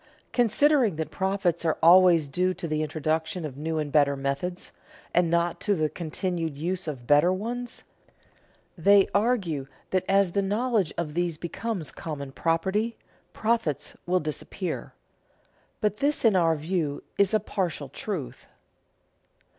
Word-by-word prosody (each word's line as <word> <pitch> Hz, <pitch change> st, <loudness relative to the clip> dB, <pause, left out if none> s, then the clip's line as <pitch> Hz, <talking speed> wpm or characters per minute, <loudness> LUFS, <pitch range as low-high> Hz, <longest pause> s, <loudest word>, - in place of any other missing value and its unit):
Considering 245 Hz, -, +3 dB
that 160 Hz, 0 st, -4 dB
profits 190 Hz, -3 st, 0 dB
are 160 Hz, -, +1 dB
always 170 Hz, -2 st, +7 dB
due 180 Hz, +6 st, 0 dB
to 170 Hz, -, -5 dB
the 155 Hz, -1 st, -1 dB
introduction 155 Hz, +2 st, -2 dB
of 140 Hz, -4 st, -6 dB
new 160 Hz, +3 st, -3 dB
and 150 Hz, -2 st, -2 dB
better 145 Hz, -2 st, +4 dB
methods, 140 Hz, +7 st, -3 dB, 0.4 s
and 175 Hz, -1 st, +3 dB
not 170 Hz, 0 st, +1 dB
to 205 Hz, -, +2 dB
the 155 Hz, -3 st, 0 dB
continued 165 Hz, -2 st, -3 dB
use 175 Hz, +3 st, -3 dB
of 135 Hz, -6 st, -5 dB
better 145 Hz, +7 st, +5 dB
ones, 240 Hz, +6 st, -4 dB, 0.9 s
they 200 Hz, +2 st, +5 dB
argue 200 Hz, -, +1 dB, 0.2 s
that 185 Hz, -1 st, +1 dB
as 195 Hz, -2 st, +4 dB
the 200 Hz, -, +1 dB
knowledge 210 Hz, -, 0 dB
of 155 Hz, -3 st, -3 dB
these 175 Hz, -1 st, -1 dB
becomes 175 Hz, +1 st, -3 dB
common 140 Hz, -4 st, -6 dB
property 190 Hz, +10 st, 0 dB, 0.3 s
profits 220 Hz, -, -1 dB
will 180 Hz, +1 st, +3 dB
disappear. 170 Hz, +4 st, -5 dB, 0.9 s
But 210 Hz, -1 st, +1 dB
this 285 Hz, 0 st, +1 dB
in 220 Hz, -4 st, +5 dB
our 165 Hz, -3 st, +3 dB
view 155 Hz, -2 st, -2 dB, 0.2 s
is 200 Hz, -1 st, +4 dB
a -, -, +4 dB
partial 180 Hz, -8 st, -3 dB
truth. 135 Hz, -, -6 dB
175 Hz, 140 wpm, -26 LUFS, 155-200 Hz, 0.9 s, always